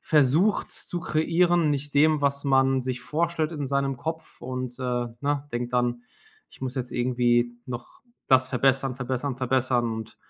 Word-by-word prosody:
versucht 155 +7 +3
zu 175 - -4
kreieren, 170 +1 +2
nicht 145 0 -2
dem, 155 +1 +4
was 140 0 0
man 135 -1 +3
sich 125 -1 -3
vorstellt 165 0 -1
in 145 -3 -3
seinem 140 -1 0
Kopf 160 +2 -6
und, 130 0 -5
äh, - - -6 0.4
ne, 145 0 -1
denkt 120 +1 -3
dann: 120 -1 +1 0.5
„Ich - - -17
muss 130 +1 -3
jetzt 125 -1 -3
irgendwie 120 -1 +2 0.2
noch 120 -1 -8 0.3
das 130 0 +5
verbessern, 135 0 +2
verbessern, 130 +1 -3
verbessern.“ 130 -1 +1
Und 110 0 -7
135 Hz, 155 wpm, -26 LUFS, 125-145 Hz, 0.5 s, das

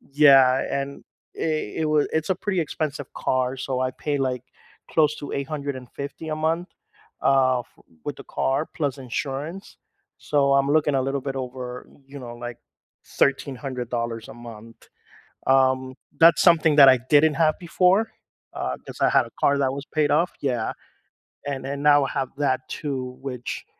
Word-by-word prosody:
yeah, 135 -2 +5 0.2
and 140 0 -7 0.3
it 155 -6 -2
it - - +1
wa 150 0 +3
it's 160 +3 -1
a - - +4
pretty 190 0 -1
expensive 150 -3 -4
car, 130 0 0
so 130 0 -2
I 130 0 0
pay 145 +3 -3
like 130 -2 -2 0.5
close 150 -2 +3
to 145 - -7
$850 140 +1 -5
a 155 - -2
month, 165 +3 -1 0.5
uh, 130 -2 +3
f 120 - -11 0.4
with - - -4
the - - -11
car, 135 +4 -1
plus 145 -4 -1
insurance, 140 +8 -5 0.4
so 140 -2 +1
I'm 140 0 +3
looking 150 -2 +2
a 135 - +2
little 135 +1 -1
bit 135 0 -5
over, 125 -1 -6 0.2
you 140 +1 -10
know, 120 -3 -8
like, 120 0 -7 0.5
$1,300 125 -4 -2
a - - -10
month. 115 -1 -12 0.6
Um, 130 -1 +3 0.2
that's 165 0 +7
something 160 -3 +5
that 140 -2 +10
I 130 - +6
didn't 150 +1 +5
have 160 -2 +2
before, 185 +5 +2 0.4
uh, 65 0 -3
'cause - - -10
I - - +5
had - - +3
a - - -13
car 140 - +4
that 135 -1 +1
was 140 +1 -6
paid 150 -1 0
off 165 +4 +2
yeah, 125 -5 -1 0.8
and 135 -2 -4
and 140 +1 -4
now 145 -1 +5
I - - -3
have 135 -3 -2
that 130 -3 +1
too, 130 -4 -5
which 125 -3 -6
140 Hz, 165 wpm, -24 LUFS, 130-150 Hz, 0.8 s, that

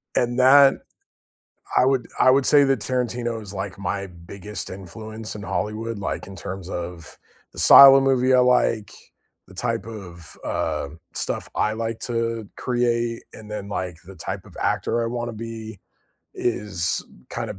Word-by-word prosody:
And 120 +1 +1
that 135 +1 +7 1.0
I - - +6
would 130 -3 +1
I 130 - +7
would 135 0 +3
say 145 -1 +6
that 135 -5 +1
Tarantino 120 -2 -2
is 100 -1 -9
like 95 0 -5
my 100 0 -3
biggest 90 +3 -8
influence 110 +4 -8
in 105 - -8
Hollywood, 110 +2 -3
like 100 - -4
in 95 -1 -10
terms 95 -2 -7
of 85 -2 -7 0.3
the - - -14
style 135 0 +10
of 135 - +4
movie 130 -1 +3
I - - +6
like, 125 -4 +2 0.6
the - - -15
type 95 - -2
of, 90 -7 -9
uh, 70 - -2 0.2
stuff - - -3
I 105 0 +1
like 115 0 -3
to 115 -3 -2
create, 120 -1 -1
and 110 -1 -12
then 105 -1 -5
like 90 -4 -4
the 95 - -12
type - - -6
of - - -16
actor 120 - 0
I - - -1
wanna 120 0 -3
be 110 -2 -8 0.5
is 95 -8 -1 0.3
kind - - -4
of 100 - -7
110 Hz, 165 wpm, -23 LUFS, 100-120 Hz, 1.0 s, style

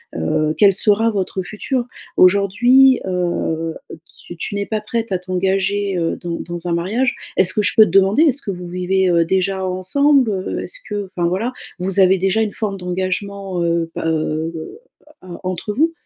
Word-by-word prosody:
heu, 155 - 0
quel 205 -2 +5
sera 210 +3 +4
votre 195 -3 -2
futur. 235 +6 -3 0.3
Aujourd'hui, 220 +8 +5
heu, 175 -3 -2 0.2
heu, - - -8 0.2
tu 175 - -11
tu - - -5
n'es 200 0 -2
pas 215 -1 -2
prête 225 0 -3
à 185 - +1
t'engager, 190 +2 -1
heu, 165 -1 -1
dans 170 -1 -4
dans 175 0 -6
un 170 - 0
mariage. 220 +10 0 0.2
Est-ce 185 -1 +3
que 210 - +1
je - - +1
peux 220 - +8
te - - -4
demander, 195 +7 +4
est-ce 280 -3 +1
que 200 - -3
vous 180 -1 -7
vivez, 185 +1 0
heu, 170 -1 +3
déjà 190 +2 0
ensemble, 250 +8 +2
heu? 190 -1 -3
Est-ce - - -3
que, 205 -1 -3
enfin, 175 -2 -2
voilà, 205 +8 -2 0.3
vous 190 +1 -1
avez 190 0 +5
déjà 195 +4 +1
une 210 - -2
forme 205 -3 -3
d'engagement, 185 +1 -3
heu, 170 -1 0
bah, - - -4
heu, 160 0 -1 0.7
heu, 185 - -13
entre 185 +3 -3
vous? 320 +7 +2
190 Hz, 185 wpm, -19 LUFS, 180-210 Hz, 0.7 s, peux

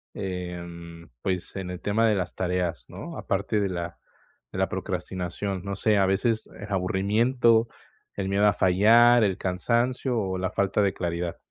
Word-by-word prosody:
Em, 85 -3 -6
pues, 90 -2 -2
en 95 -2 -4
el 90 - -7
tema 110 +3 +2
de 105 - +3
las 90 -2 -3
tareas, 90 -7 -1
¿no?, - - -8
aparte 105 - -1
de 100 - 0
la 85 -2 -4 0.5
de - - -5
la - - +1
procrastinación, 95 +1 -4
no 100 - -3
sé, 105 +1 +2
¿a 100 - +4
veces 110 +4 0
el 105 0 -8
aburrimiento, 110 +5 +2 0.5
el 95 -1 -2
miedo 100 +2 +2
a 105 - +4
fallar, 115 +6 +5
el 95 -3 +1
cansancio 120 +7 0
o 95 -3 -2
la 95 +2 -2
falta 100 +1 +1
de 100 - +1
claridad? 85 -1 -3
95 Hz, 165 wpm, -26 LUFS, 90-105 Hz, 0.5 s, fallar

